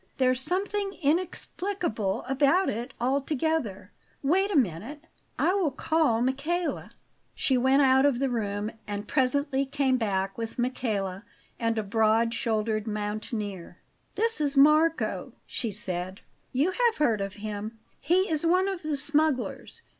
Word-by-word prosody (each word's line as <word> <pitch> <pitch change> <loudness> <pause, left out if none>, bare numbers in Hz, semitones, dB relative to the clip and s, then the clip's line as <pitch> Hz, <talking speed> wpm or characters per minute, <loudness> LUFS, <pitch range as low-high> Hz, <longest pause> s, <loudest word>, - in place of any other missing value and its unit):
There's 255 -1 +3
something 395 +4 -1
inexplicable 335 - -1
about 285 +8 +3
it 235 +5 -5
altogether. 265 - -1 0.3
Wait 375 +8 +2
a 400 - -1
moment; 250 - -1 0.3
I 360 - +2
will 385 -6 +2
call 280 -4 +1
Michele." 300 +7 -1 0.5
She 265 - +1
went 265 +3 +4
out 265 0 +5
of 280 -4 +3
the 270 +2 +1
room, 210 -3 -2 0.2
and 205 0 -4
presently 275 +1 +1
came 270 -1 +1
back 195 -3 -1
with 225 -1 -5
Michele 215 -7 -2 0.4
and 230 -1 0
a 220 - 0
broad 220 +2 +2
shouldered 220 -1 -1
mountaineer. 210 -3 -4 0.4
"This 455 -5 +1
is 285 -1 0
Marco," 305 +4 +3
she 235 - -3
said. 185 -2 -4 0.3
"You 285 +8 +1
have 475 +2 +2
heard 230 -9 +2
of 195 -1 -3
him; 210 +1 -6 0.2
he 365 +6 +2
is 310 -1 -1
one 365 +3 +3
of 385 -3 -3
the 305 -2 -2
smugglers. 295 -1 -1
260 Hz, 140 wpm, -27 LUFS, 215-310 Hz, 0.5 s, out